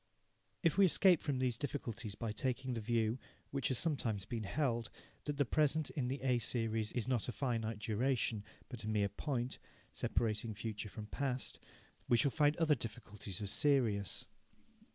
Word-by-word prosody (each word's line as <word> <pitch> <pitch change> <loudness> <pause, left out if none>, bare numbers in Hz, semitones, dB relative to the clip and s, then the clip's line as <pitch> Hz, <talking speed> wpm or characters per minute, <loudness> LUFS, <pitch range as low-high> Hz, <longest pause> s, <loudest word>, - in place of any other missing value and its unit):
If 165 +3 +3
we 195 - +9
escape 180 -1 +6
front 140 -4 -1
these 125 -3 0
difficulties 120 -7 -4
by 115 -1 -3
taking 130 +3 -1
the 115 - -2
view, 115 +1 +1 0.3
which 135 -1 0
has 130 - +2
sometimes 120 - +1
been 110 0 -3
held, 120 -3 0 0.4
that 145 -1 -2
the 140 - +3
present 150 +3 +2
in 135 -5 -1
the 135 +2 -2
A 125 -2 +3
series 115 -2 0
is 120 -1 -1
not 125 -4 +1
a - - -1
finite 115 -1 -1
duration, 110 0 0 0.2
but 120 -4 -7
a - - -4
mere 105 -2 +2
point, 125 +2 -2 0.3
separating 110 -1 0
future 105 -1 -4
from 105 +1 -7
past, 130 +2 -2 0.5
we 120 - +6
shall 140 +2 +3
find 150 +1 +3
other 165 -3 +4
difficulties 105 -5 -5
as 100 - +1
serious. 115 -9 +2
120 Hz, 170 wpm, -36 LUFS, 110-135 Hz, 0.5 s, we